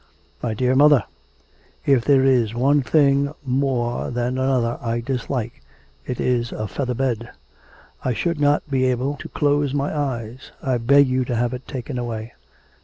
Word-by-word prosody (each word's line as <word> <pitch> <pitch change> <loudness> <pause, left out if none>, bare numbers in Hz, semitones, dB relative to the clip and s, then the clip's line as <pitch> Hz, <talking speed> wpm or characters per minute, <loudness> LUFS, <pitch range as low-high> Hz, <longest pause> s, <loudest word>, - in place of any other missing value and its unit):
'My 115 -3 -2
dear 125 +3 +1
mother, 145 -4 +6 0.8
if 135 -4 +3
there 135 -1 +4
is 120 -4 +2
one 140 +4 +3
thing 140 +1 +3
more 125 -2 -1
than 125 +1 -2
another 130 -3 0
I 115 0 -1
dislike, 120 - -3 0.5
it 125 - -4
is 120 -1 0
a 110 - -4
feather 125 +5 -3
bed. 120 -3 -2 0.7
I 125 - 0
should 170 +2 -1
not 145 +1 +2
be 135 -2 +1
able 130 +3 0
to - - -9
close 145 -1 +1
my 145 +2 -1
eyes; 130 -4 -4
I 130 -2 -1
beg 140 +5 +5
of 130 - -3
you 130 0 +1
to 120 - -2
have 120 +2 0
it 125 +1 -7
taken 130 -1 -5
away.' 115 -1 -5
130 Hz, 170 wpm, -22 LUFS, 120-140 Hz, 0.8 s, mother